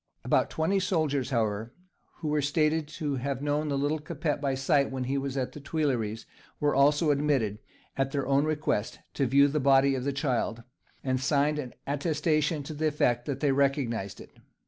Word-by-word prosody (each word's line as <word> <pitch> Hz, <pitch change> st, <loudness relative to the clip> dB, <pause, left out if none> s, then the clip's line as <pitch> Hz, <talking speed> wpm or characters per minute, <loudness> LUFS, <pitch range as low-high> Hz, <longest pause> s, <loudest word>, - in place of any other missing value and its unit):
About -, -, +2 dB
twenty 165 Hz, +5 st, +1 dB
soldiers, 155 Hz, -8 st, 0 dB
however, 110 Hz, -2 st, -1 dB, 0.4 s
who 155 Hz, -3 st, -3 dB
are 150 Hz, -, +2 dB
stated 155 Hz, +2 st, +1 dB
to 150 Hz, -2 st, -3 dB
have 135 Hz, +1 st, -3 dB
known 150 Hz, +1 st, 0 dB
the 140 Hz, -, 0 dB
"little 145 Hz, +3 st, 0 dB
Capet" 150 Hz, -1 st, -3 dB
by 135 Hz, -2 st, 0 dB
sight 140 Hz, +1 st, +2 dB
when 130 Hz, -1 st, -3 dB, 0.3 s
at 130 Hz, -2 st, -1 dB
the -, -, -9 dB
Tuileries, 130 Hz, -8 st, -1 dB, 0.3 s
were 145 Hz, 0 st, +2 dB
also 145 Hz, +3 st, +4 dB
admitted, 140 Hz, -8 st, +1 dB, 0.4 s
at 135 Hz, 0 st, 0 dB
their 140 Hz, -1 st, -2 dB
own 135 Hz, +1 st, +3 dB
request, 150 Hz, -8 st, -1 dB, 0.2 s
to 135 Hz, -, 0 dB
view 140 Hz, +3 st, +5 dB
the 150 Hz, +2 st, 0 dB
body 135 Hz, 0 st, +4 dB
of 130 Hz, -2 st, -2 dB
the 140 Hz, -, 0 dB
child, 125 Hz, -4 st, -1 dB, 0.4 s
and 130 Hz, -1 st, 0 dB
signed 145 Hz, +2 st, +2 dB
an 130 Hz, -4 st, -6 dB
attestation 155 Hz, +1 st, 0 dB
to 155 Hz, -, -7 dB
the 155 Hz, +1 st, 0 dB
effect 120 Hz, -5 st, +1 dB
that 140 Hz, -2 st, -3 dB
they 145 Hz, -2 st, +3 dB
recognized 130 Hz, -8 st, 0 dB
it. -, -, -12 dB
140 Hz, 180 wpm, -28 LUFS, 130-150 Hz, 0.4 s, view